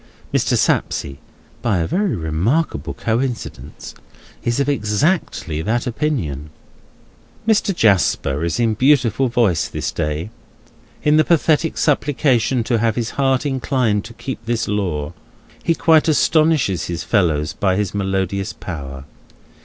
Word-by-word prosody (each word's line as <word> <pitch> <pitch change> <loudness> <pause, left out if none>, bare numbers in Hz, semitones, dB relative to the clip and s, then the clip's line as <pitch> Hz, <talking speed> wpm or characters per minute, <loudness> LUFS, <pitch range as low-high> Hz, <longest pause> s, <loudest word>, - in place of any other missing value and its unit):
Mr. - - +2
Sapsea 70 - 0 0.4
(by 115 -6 +1
a 85 - 0
very 195 - 0
remarkable 85 - -1
coincidence) 120 +1 -4 0.5
is 120 +2 0
of 140 - +1
exactly 105 - 0
that 115 +7 -1
opinion. 110 - -2 1.0
Mr. 215 -2 +3
Jasper 90 - +2
is 85 +6 -1
in 115 -2 +2
beautiful 130 0 +3
voice 115 -9 +1
this - - -3
day. 75 +7 -3 0.7
In 150 +1 +4
the 155 - +5
pathetic 160 -1 +2
supplication 135 -4 +1
to 115 -1 0
have 115 -1 +1
his 115 -2 -2
heart 135 0 +1
inclined 130 -6 0
to 115 - -10
keep 130 -3 -6
this 115 -1 -1
law, 85 -7 -2 0.5
he 165 - +1
quite 160 -1 +4
astonishes 155 - +2
his 85 0 -4
fellows 80 -8 +1
by 95 -2 +1
his 105 -2 -1
melodious 95 -1 -1
power. 70 -6 -7
115 Hz, 130 wpm, -19 LUFS, 90-140 Hz, 1.0 s, the